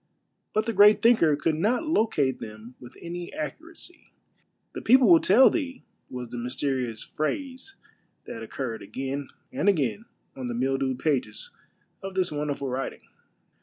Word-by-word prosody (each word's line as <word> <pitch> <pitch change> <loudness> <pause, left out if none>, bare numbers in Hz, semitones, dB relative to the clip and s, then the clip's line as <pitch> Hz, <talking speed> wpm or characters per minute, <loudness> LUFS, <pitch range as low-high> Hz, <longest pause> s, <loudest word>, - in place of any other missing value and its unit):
But 215 0 +2
the 230 - -1
great 205 +1 +6
thinker 215 -11 +5
could 155 +2 0
not 220 - +1
locate 215 - +1
them 110 +3 -9
with 125 +1 -13
any 175 0 -6
accuracy. 330 - -8 0.3
" - - -45
The - - -6
people 255 +1 +6
will 170 -3 +8
tell 225 +11 +6
thee 270 -5 -3
" - - -46
was 125 -2 -6
the 120 - -5
mysterious 125 -2 -2
phrase 265 - -4 0.5
that 115 - -7
occurred 115 0 -5
again 135 +6 -4 0.3
and 205 - +2
again 185 - 0 0.3
on 130 -2 -5
the 120 - -3
mildewed 135 +1 0
pages 155 - -2 0.5
of 195 -1 -7
this 185 -3 +1
wonderful 145 -2 -3
writ 130 +1 -3
ing. - - -19
150 Hz, 160 wpm, -26 LUFS, 130-215 Hz, 0.5 s, will